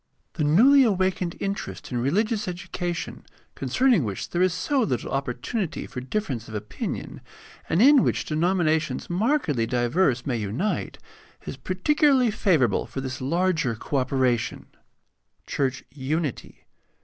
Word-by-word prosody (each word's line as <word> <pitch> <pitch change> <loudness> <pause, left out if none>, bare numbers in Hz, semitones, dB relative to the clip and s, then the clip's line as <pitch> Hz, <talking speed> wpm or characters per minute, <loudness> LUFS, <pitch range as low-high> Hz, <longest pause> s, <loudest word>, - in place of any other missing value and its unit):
The 155 - -2
newly 235 - +6
awakened 185 -5 0
interest 200 -6 -4
in 120 - -1
religious 210 - 0
education, 175 -1 -4 0.3
concern 250 - +2
ing 170 - +3
which 100 -4 -4
there 175 - 0
is 185 0 +4
so 185 - 0
little 130 - -1
opportunity 140 - -3
for 125 - -7
difference 130 - -3
of 110 - -8
opinion, 105 0 -5 0.5
and 175 +7 +3
in 280 0 +7
which - - 0
denominations 160 -3 0
markedly 180 - +1
diverse 120 +2 +1
may 125 -4 -1
unite, 115 - -2 0.5
is - - -5
particularly 260 - +2
favorable 165 - +2
for - - -6
this 130 -1 -5
larger 165 -3 +1
co 140 +6 -3
operation. 130 -3 0 0.8
Church 130 -2 -1
unity. 145 +1 -4
160 Hz, 130 wpm, -25 LUFS, 130-195 Hz, 0.8 s, in